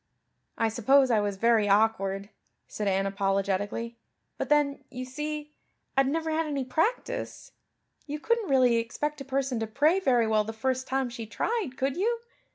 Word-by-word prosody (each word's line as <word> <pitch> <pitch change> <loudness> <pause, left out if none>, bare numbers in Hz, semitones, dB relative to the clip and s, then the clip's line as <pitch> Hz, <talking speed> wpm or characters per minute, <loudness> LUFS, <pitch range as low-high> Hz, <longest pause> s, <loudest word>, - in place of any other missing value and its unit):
"I 225 - +2
suppose 260 +4 +4
I 220 - +4
was 205 -1 -1
very 225 -1 +3
awkward," 200 -1 +2 0.4
said 210 - -4
Anne 195 0 +1
apologetically, 200 +3 -1 0.4
"but - - -2
then, 290 -2 +2
you 255 0 -6
see, 300 +3 -5 0.4
I'd 270 0 +4
never 320 +3 -1
had 320 0 0
any 280 -3 -2
practice. 325 - -2 0.6
You 300 +1 -4
couldn't 465 +2 0
really 255 -3 +4
expect 290 +6 -3
a - - -6
person 270 -2 -1
to 225 - -2
pray 300 - +3
very 250 -10 +3
well 215 -1 +2
the 220 +1 -6
first 260 +3 -1
time 265 -1 -1
she 230 -2 -7
tried, 370 - -2
could 270 +2 -1
you? 460 +5 0
255 Hz, 165 wpm, -28 LUFS, 220-295 Hz, 0.6 s, suppose